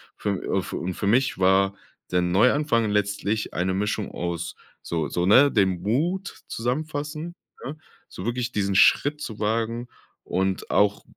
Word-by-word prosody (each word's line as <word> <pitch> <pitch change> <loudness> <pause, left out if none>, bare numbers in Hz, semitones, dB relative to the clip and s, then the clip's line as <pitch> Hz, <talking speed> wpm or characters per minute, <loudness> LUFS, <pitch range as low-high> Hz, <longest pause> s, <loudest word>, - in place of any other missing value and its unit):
Für 105 - -2 0.2
und - - +2
für - - -5
und 90 +2 -3
für 100 - -3
mich 125 +4 +2
war 95 +1 +3 0.4
der 90 0 +2
Neuanfang 115 +6 +3
letztlich 105 +1 -1
eine 95 +1 0
Mischung 105 +1 -2
aus 85 -1 -4 0.3
so 80 -3 -2
so, 90 - -1
ne, 130 +9 +6
dem 95 -5 +2
Mut 170 - 0 0.2
zusammenfassen, 150 +6 -3 0.3
ne, 145 +3 -6 0.3
so 90 - -8
wirklich 120 +1 -2
diesen 100 -3 -1
Schritt 150 +9 +4
zu 110 -2 -6
wagen 115 +3 -1 0.4
und 95 0 -1
auch 105 0 +2
105 Hz, 150 wpm, -25 LUFS, 95-125 Hz, 0.4 s, ne